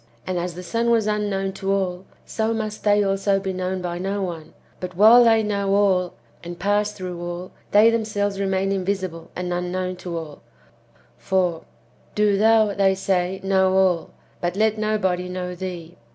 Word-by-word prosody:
And 185 -1 -2
as 175 0 -4
the 180 - -7
son 230 +7 -1
was 230 -2 +3
unknown 205 -2 -1
to 195 0 -3
all, 190 -1 -1 0.2
so 225 0 -1
must 215 -1 -4
they 205 0 +4
also 195 0 +1
be 190 -1 -3
known 185 0 -3
by 175 -1 -3
no 195 +2 -2
one; 165 -4 -6 0.2
but 180 0 -6
while 225 +4 +8
they 225 -1 +4
know 200 -1 0
all, 190 -3 +2 0.3
and 175 0 -7
pass 205 +2 +1
through 180 -3 -7
all, 175 +1 -6 0.2
they 215 +3 +6
themselves 205 -3 -1
remain 195 0 0
invisible 185 -3 -3
and 180 0 -3
unknown 180 +1 -3
to 175 -2 -5
all; 155 -3 -8 0.8
for, 180 -3 0 0.5
"Do 210 -1 +3
thou," 215 0 +4
they 195 -1 +2
say, 190 -1 -1
"know 190 -1 +2
all, 185 -3 +2 0.3
but 175 +1 -2
let 215 +1 +2
nobody 190 -4 0
know 180 0 -4
thee." 175 -2 -7
190 Hz, 170 wpm, -22 LUFS, 180-205 Hz, 0.8 s, while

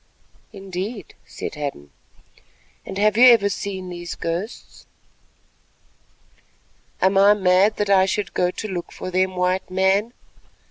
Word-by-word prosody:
"Indeed," 195 +2 -7
said - - -7
Hadden, 140 - -6 1.0
"and - - -6
have 210 +1 +2
you 250 +2 +8
ever 225 -5 +5
seen 190 -2 -5
these 175 -1 -7
ghosts?" 175 +7 -6 2.1
"Am 190 +1 +3
I 205 +1 +6
mad 190 +2 +3
that 205 -1 -1
I 190 -1 +5
should 205 +1 -2
go 180 - +1
to 215 - -6
look 180 -4 -6
for 185 - -7
them, 185 +1 0
White 180 +1 -1
Man? 190 +5 +1
190 Hz, 130 wpm, -22 LUFS, 180-205 Hz, 2.1 s, you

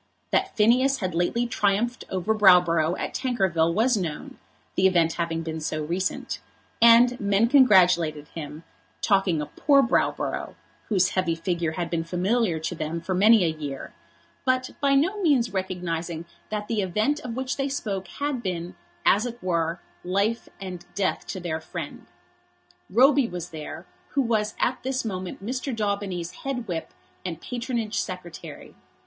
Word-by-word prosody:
That 385 0 0
Phineas 255 +5 +4
had 185 -4 -3
lately 175 +8 +1
triumphed 230 +1 0
over 190 +3 0
Browborough 180 -5 +5
at - - -3
Tankerville 190 -10 +1
was 225 +7 +3
known, 165 -7 -4 0.3
the 190 - +4
event 170 -3 +3
having 165 -1 -2
been 160 0 -4
so 155 0 -3
recent; 175 +5 -2 0.4
and 235 +2 +7
men 200 +2 +3
congratulated 180 - +4
him, 155 0 -8 0.4
talking 195 -6 +2
of - - -11
poor 280 -1 +5
Browborough, 230 - 0 0.3
whose 190 -4 +3
heavy 180 -3 0
figure 165 -1 -2
had 170 +1 -3
been 165 -1 0
familiar 180 +2 0
to 160 - -2
them 160 0 -3
for 170 +3 -3
many 205 +1 +6
a - - +2
year, 145 -4 -6 0.5
but 255 -1 +1
by 275 -1 +4
no 370 +9 +2
means 280 - +2
recognising 175 -3 -3 0.2
that 210 -1 -3
the 220 -3 0
event 215 +10 0
of 245 -5 -6
which 260 +1 -2
they 275 0 -1
spoke 200 -8 -3
had 285 -3 -3
been, 180 -4 -4 0.3
as 210 +5 +4
it 240 0 -7
were, 170 -1 -1 0.2
life 200 +5 0
and 185 -3 -7
death 195 -2 -1
to 185 - -4
their 165 -3 -3
friend. - - -7 0.8
Roby 265 +5 +5
was 175 -2 -6
there, 155 +2 -7 0.3
who 275 - +2
was 220 -3 0
at 250 - 0
this 260 -1 -2
moment 185 -2 -5
Mr. 255 +3 -3
Daubeny's 200 -5 -2
head 250 -4 -3
whip 170 -3 -4 0.3
and 170 -3 -4
patronage 235 -1 -3
secretary. 180 -3 -7
190 Hz, 155 wpm, -25 LUFS, 170-235 Hz, 0.8 s, and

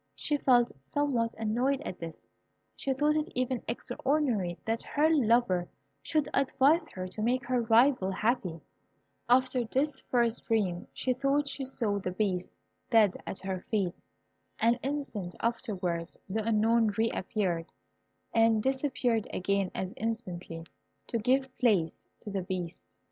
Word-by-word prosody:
She 295 - 0
felt 245 -4 +4
somewhat 240 - 0
annoyed 240 +5 +1
at 185 - -6
this. 165 -2 -8 0.5
She 275 - -2
thought 295 +3 +2
it 305 +1 0
even 255 -1 0
extraordinary 240 - -1
that 225 +1 0
her 310 +2 +2
lover 230 - +3 0.3
should 305 -3 0
advise 275 +4 +3
her 185 0 -5
to 215 - -6
make 240 +2 +1
her 250 0 +1
rival 230 -2 +4
happy. 190 -5 -1 0.7
After 255 0 +3
this 265 +4 0
first 235 -2 +1
dream, 195 -6 0
she 255 - 0
thought 275 +3 +1
she 275 -1 -4
saw 225 -6 -1
the 185 - -3
Beast 185 -1 -1 0.4
dead 220 -5 +4
at - - -4
her 190 -1 -3
feet. 195 -5 -1 0.6
An 235 +2 +3
instant 260 -10 -4
afterwards 185 -8 -2
the 215 +3 -1
Unknown 225 +1 +3
re 225 +1 +2
appeared, 180 -4 -2 0.6
and 225 -1 +4
disappeared 260 -4 0
again 195 0 0
as 190 0 -3
instantly, 180 -7 -4 0.4
to 230 - -2
give 260 +3 +1
place 195 -10 +2 0.2
to 210 - -7
the 195 -1 -1
Beast. 180 -2 -5
230 Hz, 140 wpm, -30 LUFS, 190-260 Hz, 0.7 s, felt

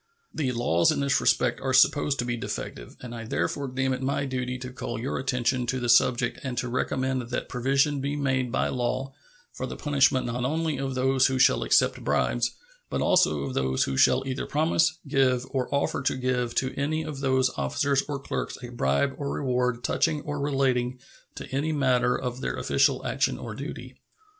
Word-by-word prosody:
The 135 -5 -1
laws 100 -9 +2
in - - -1
this 140 -1 +2
respect - - +2
are 130 -1 0
supposed 140 +2 +4
to 120 - -1
be 120 0 -1
defective, - - -6
and 125 -1 -8
I 115 -1 -6
therefore 110 - -2
deem 130 +1 -1
it 130 - -4
my 140 +1 -1
duty 125 -1 -3
to 125 0 -8
call 125 -3 -5
your 130 +4 -3
attention 125 -1 0
to 130 +2 -1
the 120 -1 -2
subject 120 0 +3
and 130 -3 -4
to 125 - -1
recommend 130 +1 -1
that 125 - -3
provision 135 +3 +1
be 140 +2 -2
made 130 -3 0
by - - 0
law 130 +2 -2 0.4
for - - -4
the - - -6
punishment 135 -3 +2
not 120 +1 -3
only 155 +2 -1
of 135 -1 -3
those 130 0 +3
who 130 - -1
shall 130 - +4
accept - - +2
bribes, - - +1 0.4
but - - -2
also 75 - +3
of 70 -2 -4
those 65 0 +1
who 65 - -2
shall 130 - +4
either 130 0 -3
promise, 160 +2 +2
give, 130 -3 +2
or 130 -2 -1
offer 140 0 0
to 130 - 0
give 125 -2 -1
to 130 0 0
any 155 +3 -1
of 150 -3 -6
those 130 -2 +2
officers 135 - +1
or 145 - -2
clerks 135 - -4
a 120 - -6
bribe 120 - +1
or 140 -1 -3
reward 125 -3 -1
touching 155 -3 +1
or 145 0 -4
relating 130 -3 0 0.4
to - - -7
any 145 +4 0
matter 125 -4 +2
of 125 0 -4
their - - -2
official - - +1
action - - 0
or - - -7
duty. - - -8
130 Hz, 195 wpm, -26 LUFS, 125-140 Hz, 0.4 s, supposed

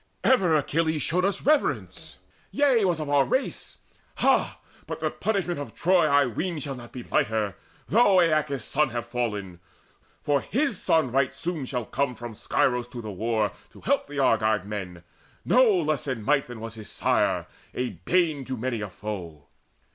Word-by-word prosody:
Ever 190 -11 +4
Achilles 160 +1 +1
showed 180 +3 +1
us 195 - -1
reverence 300 +1 0 0.3
yea, 270 -6 +3
Was 175 -3 +1
of 155 - -3
our 145 -1 +4
race. 260 - -2 0.4
Ha, - - +2 0.3
but - - -5
the - - -1
punishment 190 -6 -1
Of 145 - -7
Troy, 180 -2 +3
I 140 -1 +4
ween, 165 - -3
shall 140 -1 -3
not 120 -2 -10
be 125 - -7
lighter, 110 -4 0 0.3
though 205 -3 +5
Aeacus' 155 -5 +1
son 150 0 +1
have 120 0 -4
fallen; 105 -7 -3 0.6
for 145 -2 +2
his 270 -4 -1
son 160 -6 +2
Right 135 +1 +1
soon 155 -2 -4
shall 125 -4 -3
come 140 +2 -1
from 120 0 -7
Scyros 125 +3 0
to 120 - -5
the 105 - -5
war 110 +2 0 0.2
To - - -15
help 280 +3 +1
the 145 0 -8
Argive 110 -6 +2
men, 95 -5 -6 0.4
no 255 - +5
less 155 -6 0
in 125 -5 -3
might 145 +3 +2
Than 120 -2 -8
was 115 -1 -6
his 110 -2 -10
sire, - - +1 0.3
a 125 -1 -1
bane 150 - 0
to 130 0 -4
many 120 -1 -2
a 105 - -4
foe. 90 -7 -7
135 Hz, 175 wpm, -26 LUFS, 110-165 Hz, 0.6 s, though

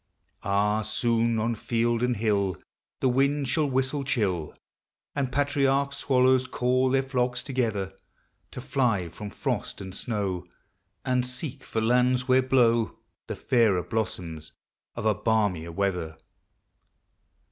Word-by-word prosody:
Ah, 105 +2 +1
soon 115 +1 +1
on 115 +2 0
Held 115 +1 0
and 125 -2 +1
hill 100 -5 +1 0.4
The - - +3
wind 140 +2 +2
shall 145 +3 +1
whistle 135 +2 0
chill, 100 - -1 0.6
And 135 -3 -1
patriarch 140 0 +1
swallows 130 -2 +3
call 130 +1 +1
their 135 +1 +2
flocks 125 -2 -1
together, 110 -8 -1 0.6
To 125 - -8
fly 115 - 0
from 105 +5 -8
frost - - -3
and 95 -1 -7
snow, 95 -4 -3 0.6
And 125 -1 +2
seek 130 +2 -6
for 110 - -2
lands 125 +2 +2
where 130 0 +5
blow 120 -3 +2 0.3
The - - -4
fairer 110 -9 +2
blossoms 85 -8 -4 0.4
of - - -5
a 110 - +4
balmier 100 -6 0
weather. 90 -4 -2
120 Hz, 125 wpm, -27 LUFS, 100-130 Hz, 0.6 s, where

